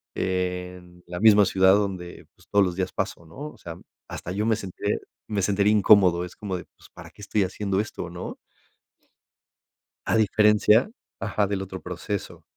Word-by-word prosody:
en 90 Hz, -1 st, -4 dB
la 90 Hz, 0 st, -6 dB
misma 105 Hz, -2 st, +7 dB
ciudad 95 Hz, 0 st, +4 dB
donde, 95 Hz, -4 st, -3 dB
pues, -, -, -24 dB
todos 100 Hz, -1 st, +4 dB
los 90 Hz, -1 st, -3 dB
días 95 Hz, 0 st, -2 dB
paso, 85 Hz, -, -4 dB
¿no? 140 Hz, -, -8 dB
O -, -, -18 dB
sea, 85 Hz, 0 st, -9 dB, 0.3 s
hasta 85 Hz, -, -6 dB
yo 105 Hz, +2 st, -1 dB
me 115 Hz, -1 st, +3 dB
sentiré, 95 Hz, -2 st, -3 dB, 0.3 s
me 105 Hz, -2 st, -1 dB
sentiría 100 Hz, +2 st, +2 dB
incómodo. 95 Hz, -4 st, +5 dB
Es 90 Hz, -, -12 dB
como 95 Hz, -3 st, -4 dB
de 90 Hz, -, -9 dB
pues -, -, -21 dB
para -, -, -11 dB
qué -, -, -16 dB
estoy 100 Hz, 0 st, 0 dB
haciendo 95 Hz, +1 st, -2 dB
esto, 105 Hz, -5 st, -4 dB
¿no? 90 Hz, +1 st, -7 dB, 1.7 s
A -, -, +2 dB
diferencia, 105 Hz, -, +4 dB, 0.3 s
ajá, 100 Hz, +1 st, 0 dB
del 95 Hz, -1 st, -2 dB
otro 95 Hz, -1 st, -7 dB
proceso. 90 Hz, +3 st, -5 dB
95 Hz, 170 wpm, -25 LUFS, 90-105 Hz, 1.7 s, misma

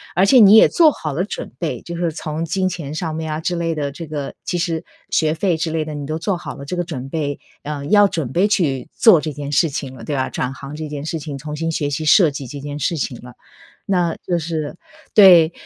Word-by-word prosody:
而 185 Hz, -, +4 dB
且 255 Hz, +6 st, +6 dB
你 210 Hz, -1 st, +8 dB
也 -, -, +8 dB
做 330 Hz, -3 st, +5 dB
好 155 Hz, -, -4 dB
了 165 Hz, +7 st, -1 dB
准 -, -, -6 dB
备， 125 Hz, -, -3 dB
就 170 Hz, 0 st, -7 dB
是 170 Hz, -2 st, -1 dB
从 155 Hz, 0 st, -4 dB
金 185 Hz, +3 st, 0 dB
钱 155 Hz, -5 st, -6 dB
上 160 Hz, -2 st, -3 dB
面 160 Hz, 0 st, -4 dB
啊 155 Hz, -, -4 dB
之 175 Hz, +1 st, -1 dB
类 165 Hz, -1 st, -1 dB
的， 145 Hz, -2 st, -2 dB
这 165 Hz, +4 st, -8 dB
个 145 Hz, -2 st, -5 dB
其 175 Hz, -, -1 dB
实 165 Hz, -2 st, -2 dB, 0.2 s
学 155 Hz, -1 st, +2 dB
费 175 Hz, 0 st, 0 dB
之 165 Hz, +1 st, -2 dB
类 160 Hz, 0 st, -1 dB
的， 155 Hz, 0 st, -6 dB
你 145 Hz, -1 st, -5 dB
都 155 Hz, +2 st, -3 dB
做 180 Hz, +2 st, -1 dB
好 -, -, -7 dB
了 140 Hz, -, -9 dB
这 175 Hz, +6 st, -5 dB
个 175 Hz, -, -1 dB
准 135 Hz, -6 st, -6 dB
备， 145 Hz, -3 st, -2 dB, 0.3 s
呃， 145 Hz, -1 st, -5 dB
要 205 Hz, -1 st, +6 dB
准 155 Hz, -9 st, -3 dB
备 185 Hz, +7 st, +3 dB
去 150 Hz, -11 st, 0 dB
做 215 Hz, -8 st, +6 dB
这 155 Hz, 0 st, -4 dB
件 145 Hz, 0 st, -6 dB
事 145 Hz, +4 st, +3 dB
情 135 Hz, -2 st, -5 dB
了， 115 Hz, -3 st, -11 dB
对 145 Hz, -, -2 dB
吧？ 130 Hz, -1 st, -1 dB
转 125 Hz, +1 st, -3 dB
行 140 Hz, +1 st, -9 dB
这 155 Hz, -1 st, -5 dB
件 145 Hz, 0 st, -6 dB
事 165 Hz, 0 st, -3 dB
情， 145 Hz, -2 st, -6 dB
重 150 Hz, +2 st, -7 dB
新 165 Hz, +1 st, -2 dB
学 150 Hz, -3 st, -1 dB
习 150 Hz, +2 st, -3 dB
设 165 Hz, -1 st, +6 dB
计 140 Hz, -2 st, -7 dB
这 140 Hz, +3 st, -8 dB
件 145 Hz, +1 st, -6 dB
事 165 Hz, -, 0 dB
情 130 Hz, -4 st, -3 dB
了， 125 Hz, 0 st, -12 dB, 0.5 s
那 175 Hz, -4 st, +1 dB
就 175 Hz, -2 st, 0 dB
是 160 Hz, 0 st, -4 dB, 0.4 s
对。 175 Hz, -6 st, +8 dB
155 Hz, 275 characters per minute, -20 LUFS, 145-175 Hz, 0.5 s, 你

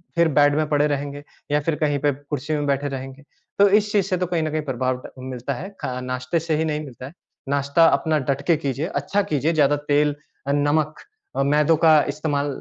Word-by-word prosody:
फिर 170 Hz, 0 st, +4 dB
बेड 145 Hz, 0 st, +5 dB
में 155 Hz, 0 st, +1 dB
पड़े 150 Hz, 0 st, +3 dB
रहेंगे, 145 Hz, 0 st, -3 dB, 0.3 s
या 145 Hz, -, +3 dB
फिर 165 Hz, -, +2 dB
कहीं 145 Hz, -1 st, +1 dB
पे 145 Hz, +1 st, +2 dB
कुर्सीयों 145 Hz, +2 st, -4 dB
में 145 Hz, -, -2 dB
बैठे 140 Hz, 0 st, 0 dB
रहेंगे। 135 Hz, +1 st, -7 dB, 0.4 s
तो 200 Hz, -, +7 dB
इस 210 Hz, -1 st, -1 dB
चीज़ 205 Hz, -3 st, +2 dB
से 185 Hz, -2 st, 0 dB
तो 180 Hz, -, 0 dB
कहीं 170 Hz, -2 st, 0 dB
न 155 Hz, -, -2 dB
कहीं 155 Hz, 0 st, -1 dB
प्रभाव 130 Hz, -1 st, -1 dB
ट -, -, -9 dB
मिलता 130 Hz, +1 st, -4 dB
है। 160 Hz, +10 st, -6 dB
ख -, -, -3 dB, 0.2 s
नाश्ते 130 Hz, +5 st, -2 dB
से 160 Hz, 0 st, -1 dB
ही 160 Hz, -, 0 dB
नहीं 150 Hz, -1 st, -1 dB
मिलता 130 Hz, -2 st, -10 dB
है। 140 Hz, -, -10 dB, 0.4 s
नाश्ता 140 Hz, +3 st, +3 dB
अपना 155 Hz, +1 st, +2 dB
डट 140 Hz, 0 st, 0 dB
के 170 Hz, -3 st, +4 dB
कीजिए, 140 Hz, 0 st, -2 dB
अच्छा 200 Hz, +1 st, -1 dB
कीजिए। 150 Hz, +3 st, +1 dB
ज़्यादा 145 Hz, -2 st, +3 dB, 0.2 s
तेल 145 Hz, 0 st, +3 dB, 0.3 s
अ, -, -, +1 dB
नमक 145 Hz, +2 st, +1 dB, 0.4 s
अ, -, -, +1 dB
मैदों 150 Hz, +3 st, +3 dB
का 155 Hz, -1 st, +6 dB
इस्तेमाल 145 Hz, -1 st, -1 dB
145 Hz, 225 wpm, -22 LUFS, 140-155 Hz, 0.4 s, तो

